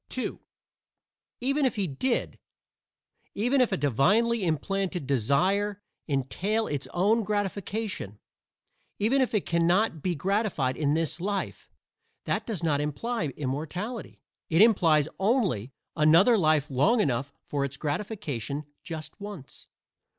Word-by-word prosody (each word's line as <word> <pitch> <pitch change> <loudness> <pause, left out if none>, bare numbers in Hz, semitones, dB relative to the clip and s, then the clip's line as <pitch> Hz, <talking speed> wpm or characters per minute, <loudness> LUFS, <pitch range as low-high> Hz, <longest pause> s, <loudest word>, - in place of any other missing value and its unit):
(2) 255 - -4 1.0
Even 275 +4 +1
if 260 - +2
he 205 -3 0
did 180 - -1 1.0
even 245 +6 +2
if 250 - +2
a - - +1
divinely 205 - +2
implanted 180 +1 -1
desire 185 - +1 0.3
entail 180 - 0
its 145 -2 -3
own 205 +6 +2
gratification 205 - -3 0.8
even 245 +7 +2
if 250 -3 0
it 210 - +1
cannot 170 +1 +2
be 180 +1 -1
gratified 185 - 0
in 145 -1 +1
this 165 +1 -1
life 200 +1 -3 0.6
that - - -1
does 205 -8 -4
not 145 -3 +2
imply 165 - -2
immortality. 160 - -4 0.3
It 165 +5 +6
implies 165 -10 +4
only 190 - +1 0.2
another 165 +9 +6
life 155 -6 +2
long 195 - +3
enough 135 - 0
for 145 -1 -1
its 140 0 -3
gratification 150 - -3 0.2
just 160 -3 -7
once. 200 -9 -9
180 Hz, 120 wpm, -27 LUFS, 145-215 Hz, 1.0 s, It